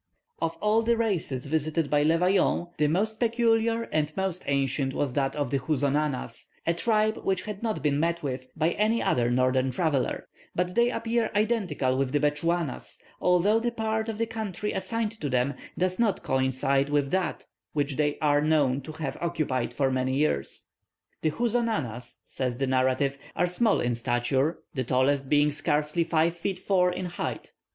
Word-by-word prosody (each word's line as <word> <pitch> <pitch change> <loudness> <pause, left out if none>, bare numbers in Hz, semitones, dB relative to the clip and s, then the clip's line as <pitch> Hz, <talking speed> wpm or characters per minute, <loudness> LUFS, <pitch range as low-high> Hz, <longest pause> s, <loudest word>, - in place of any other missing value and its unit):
Of 165 0 -1
all 215 +2 +3
the 230 +1 +2
races 180 - -1
visited 155 +1 -1
by 145 0 +4
Le 160 +3 +3
Vaillant, 180 -1 +1
the 150 - +4
most 215 +8 0
peculiar 230 -1 +2
and 155 -1 0
most 190 -2 -1
ancient 135 -1 0
was 140 -4 -1
that 135 -1 0
of 145 -4 -2
the 140 - +1
Houzonanas, 145 0 -1 0.2
a 170 - +2
tribe 215 +4 +1
which 190 -1 -1
had 210 -2 -6
not 225 -2 -2
been 145 -1 +2
met 170 +1 0
with 130 -2 -4
by 160 +2 +2
any 215 +4 +1
other 120 -1 +2
northern 130 +1 +2
traveller; 140 0 -1 0.3
but 180 0 0
they 235 +4 +3
appear 230 -2 0
identical 200 - +1
with 135 -1 -1
the 145 - +3
Bechuanas, 150 +1 -1 0.2
although 180 +5 +3
the 240 +1 0
part 220 -1 -1
of 220 - -4
the 230 - +1
country 215 -3 -4
assigned 210 +3 -2
to 145 - -1
them 130 +2 +1 0.2
does 185 +2 0
not 215 -5 +1
coincide 130 +1 +1
with 145 -2 +1
that 185 -3 -1 0.3
which 145 -2 -1
they 150 0 0
are 145 -1 +4
known 145 -4 +2
to 155 +4 -8
have 155 -3 -4
occupied 155 -8 -1
for 135 -2 0
many 130 0 0
years. 145 - -1 0.6
"The 155 - +2
Houzonanas," 210 - -2
says 125 -2 -3
the 135 - 0
narrative, 130 +1 +1 0.2
"are 175 - +2
small 200 +5 +2
in 120 0 0
stature, 120 +6 0
the 130 -4 -1
tallest 130 +2 +1
being 150 0 +4
scarcely 150 +2 0
five 165 0 +1
feet 185 +2 -3
four 185 -1 +2
in 185 +1 -4
height. 175 0 -5
155 Hz, 175 wpm, -27 LUFS, 135-195 Hz, 0.6 s, by